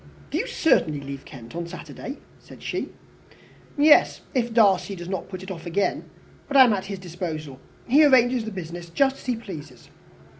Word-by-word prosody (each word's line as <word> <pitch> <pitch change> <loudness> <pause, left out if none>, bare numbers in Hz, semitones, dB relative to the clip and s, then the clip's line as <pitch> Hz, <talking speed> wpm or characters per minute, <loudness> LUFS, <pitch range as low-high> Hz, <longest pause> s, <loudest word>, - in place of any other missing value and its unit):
"Do - - 0
you - - -2
certainly 155 - +2
leave 140 0 -8
Kent 120 -1 -11
on 170 0 -4
Saturday?" 170 - -8 0.2
said - - -15
she. - - -3 0.9
"Yes 295 +1 +5
if 240 -3 0
Darcy 200 -3 +3
does 175 -1 -8
not 190 -1 -4
put 185 -1 -7
it 190 - -7
off 170 -1 -7
again. 195 +4 -1 0.4
But 280 - +1
I 265 - +11
am 240 -4 +4
at 195 -2 -2
his 195 0 -5
disposal. 160 -6 -6 0.3
He 285 +6 +6
arranges 250 -4 +5
the 220 - -5
business 175 -2 -7
just 270 +8 +2
as - - -14
he 250 - +1
pleases." 150 - -10
190 Hz, 185 wpm, -24 LUFS, 165-240 Hz, 0.9 s, I